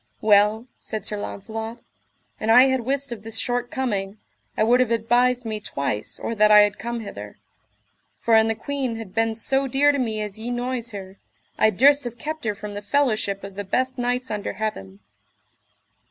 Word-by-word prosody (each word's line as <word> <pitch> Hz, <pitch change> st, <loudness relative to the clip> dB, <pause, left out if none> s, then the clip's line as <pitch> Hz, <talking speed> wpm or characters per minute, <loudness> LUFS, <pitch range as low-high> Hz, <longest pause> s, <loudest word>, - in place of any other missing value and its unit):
Well, 210 Hz, +2 st, +4 dB
said 215 Hz, -2 st, -5 dB
Sir 210 Hz, -, -3 dB
Launcelot, 220 Hz, +3 st, -6 dB, 0.6 s
an 215 Hz, -, -2 dB
I 245 Hz, +3 st, +8 dB
had 260 Hz, 0 st, +1 dB
wist 270 Hz, +2 st, -2 dB
of 230 Hz, -3 st, -6 dB
this 225 Hz, +1 st, -6 dB
short 245 Hz, +1 st, -1 dB
coming, 205 Hz, -7 st, -2 dB, 0.4 s
I -, -, +3 dB
would 240 Hz, +3 st, +4 dB
have 255 Hz, -3 st, +2 dB
advised 240 Hz, +2 st, +2 dB
me 215 Hz, -1 st, -3 dB
twice 140 Hz, -, -4 dB
or -, -, -4 dB
that 215 Hz, -1 st, +4 dB
I 210 Hz, 0 st, +9 dB
had 205 Hz, -1 st, +1 dB
come 235 Hz, 0 st, -4 dB
hither; 105 Hz, -, -9 dB, 0.8 s
for 230 Hz, -, +1 dB
an 220 Hz, 0 st, +6 dB
the 225 Hz, -, 0 dB
queen 270 Hz, -2 st, -3 dB
had 225 Hz, -4 st, -8 dB
been 225 Hz, 0 st, +1 dB
so 270 Hz, +4 st, 0 dB
dear 275 Hz, +3 st, +4 dB
to 285 Hz, -, -2 dB
me 220 Hz, -4 st, -1 dB
as 210 Hz, 0 st, -4 dB
ye 230 Hz, +2 st, -5 dB
noise 245 Hz, 0 st, -2 dB
her, 195 Hz, -3 st, -9 dB, 0.4 s
I 215 Hz, -, +4 dB
durst 280 Hz, +7 st, +4 dB
have 240 Hz, 0 st, -6 dB
kept 310 Hz, +3 st, -5 dB
her 210 Hz, -1 st, 0 dB
from 210 Hz, 0 st, -7 dB
the 205 Hz, -, -5 dB
fellowship 215 Hz, -4 st, 0 dB
of 195 Hz, 0 st, -8 dB
the 205 Hz, +1 st, -5 dB
best 255 Hz, +6 st, -1 dB
knights 245 Hz, +1 st, -1 dB
under 210 Hz, -1 st, -3 dB
heaven. 100 Hz, -, -5 dB
225 Hz, 195 wpm, -23 LUFS, 210-250 Hz, 0.8 s, I